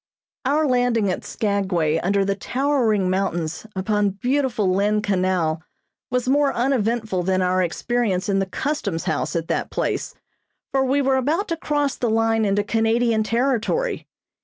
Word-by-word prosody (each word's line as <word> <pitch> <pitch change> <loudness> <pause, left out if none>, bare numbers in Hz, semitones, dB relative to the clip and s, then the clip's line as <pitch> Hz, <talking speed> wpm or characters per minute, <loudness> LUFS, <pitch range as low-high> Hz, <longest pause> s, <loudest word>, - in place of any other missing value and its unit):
Our 300 +4 +2
landing 245 -6 +2
at - - -4
Skagway 190 -7 0
under 195 +3 +1
the 200 - +1
towering 230 -2 0
mountains 175 -1 -2
upon 205 +2 +1
beautiful 245 -6 +1
Lynn 210 +2 +1
Canal 180 -5 0 0.5
was 250 0 -1
more 280 +1 +3
uneventful 230 -6 0
than 185 +1 +1
our 185 +1 +2
experience 195 +2 -1
in 195 -1 +1
the 195 - -1
Customs 200 - -2
House 155 +2 -2
at 165 -1 -2
that - - -1
place, - - -2 0.6
for 270 -1 +2
we 275 +2 +1
were 265 0 +2
about 310 +10 0
to 335 - 0
cross 290 -3 -1
the 240 - 0
line 225 0 +2
into 205 0 +1
Canadian 225 +1 +1
territory. 250 - 0
220 Hz, 150 wpm, -22 LUFS, 190-255 Hz, 0.6 s, more